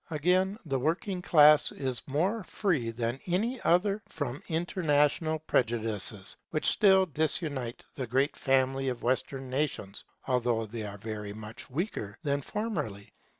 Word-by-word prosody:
Again, 180 +6 +1
the 135 -4 -1
working 180 +6 -1
class 150 -4 +6
is 130 -3 -3
more 185 +10 0
free 165 - -1
than 115 +2 -2
any 220 +8 0
other 195 +4 +2
from 145 -3 -4
international 160 -2 +1
prejudices, 115 -8 0
which 155 - -2
still 190 -2 +5
disunite 150 -5 -1
the 130 -3 -4
great 135 +5 +1
family 135 0 +1
of 125 -2 -5
Western 130 +2 0
nations, 130 -8 -2 0.2
although 120 -3 +1
they 110 +1 -6
are 100 0 -8
very 105 -1 -6
much 110 +1 -9
weaker 135 - -3
than 140 -1 0
formerly. 130 - -4
140 Hz, 135 wpm, -29 LUFS, 120-170 Hz, 0.2 s, class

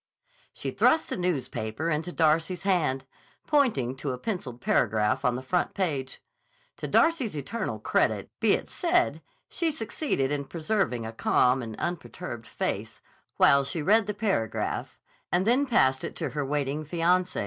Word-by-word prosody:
She - - -4
thrust 320 - +3
the - - 0
newspaper 145 -6 -2
into 155 +3 -1
Darcy's 165 +2 +1
hand, 160 -9 +1 0.4
pointing 215 - +2
to 140 - -3
a - - -5
penciled 130 - -4
paragraph 110 -3 +1
on 125 -1 +2
the 130 - -5
front 180 +7 0
page. 145 -9 -2 0.5
To - - -4
Darcy's 300 - +2
eternal 225 - -3
credit - - 0
be - - +4
it - - -1
said, 350 0 +1 0.3
she 335 -2 -1
succeeded 225 - -1
in 145 -1 -1
preserving 160 - -1
a 110 - -6
calm 125 +3 +3
and 110 -2 -6
unperturbed 170 -8 -5
face, - - -3 0.4
while 140 0 +6
she 155 +3 -3
read 210 +5 +4
the 210 - -2
paragraph, 195 - -1 0.3
and 180 +2 +2
then 255 +5 +3
passed 130 - +3
it - - -5
to - - -3
her 145 -1 -2
waiting 145 +1 -1
fiancé. 175 +3 +1
160 Hz, 155 wpm, -27 LUFS, 130-200 Hz, 0.5 s, while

